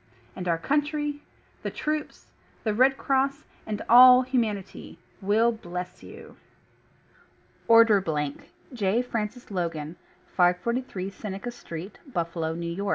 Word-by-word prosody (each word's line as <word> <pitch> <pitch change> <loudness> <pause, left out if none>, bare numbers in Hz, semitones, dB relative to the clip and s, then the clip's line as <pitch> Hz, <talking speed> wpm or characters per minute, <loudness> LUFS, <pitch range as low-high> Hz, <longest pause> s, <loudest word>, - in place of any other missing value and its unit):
And 180 -1 -5
our 165 -1 +2
Country, 295 - -1 0.4
the - - -3
Troops, 305 0 -4 0.3
the 215 - 0
Red 260 +4 +4
Cross, 275 +2 0 0.2
and 210 -1 -3
all 250 +1 +9
humanity 225 -7 -3 0.2
,will 215 +4 +3
BLESS 180 -4 -7
YOU. - - -13 1.3
ORDER 230 -3 +6
BLANK 150 -5 -3 0.2
J. 220 +1 +1
FRANCIS 230 -1 -5
LOGAN, 165 -3 -3 0.3
543 185 +3 0
Seneca 200 +4 -6
Street, 175 -4 -9
Buffalo, 165 -4 -2
N. 170 +1 -5
Y. 200 - -2
210 Hz, 115 wpm, -26 LUFS, 180-250 Hz, 1.3 s, all